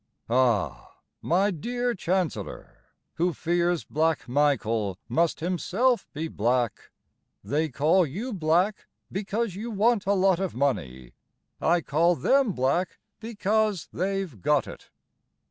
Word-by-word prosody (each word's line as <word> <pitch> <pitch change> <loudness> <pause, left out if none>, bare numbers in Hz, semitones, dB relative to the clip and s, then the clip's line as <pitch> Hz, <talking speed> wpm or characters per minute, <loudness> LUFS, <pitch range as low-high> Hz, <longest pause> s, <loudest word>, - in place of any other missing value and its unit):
Ah, 120 -5 +1 0.3
my 190 +5 +2
dear 245 +8 -2
Chancellor, 185 -3 -3 0.3
Who 175 +1 +1
fears 175 +2 0
Black 160 0 0
Michael 115 -8 +1
Must 170 -1 +1
himself 190 +7 0
be 160 +3 -4
black. 120 -3 -1 0.5
They 155 +3 0
call 160 +6 +3
you 215 - -5
Black 180 +4 +1 0.2
because 210 +2 -2
you 215 +6 -5
want 220 -1 +1
a 200 - +4
lot 190 -2 +3
of 190 -7 -3
money; 65 - -2 0.5
I 170 +1 +3
call 165 +4 +2
them 260 - +2
black 135 +8 0 0.2
because 215 -3 -1
they've 185 - -3
got 150 +1 +2
it. - - -11
175 Hz, 120 wpm, -26 LUFS, 145-200 Hz, 0.5 s, a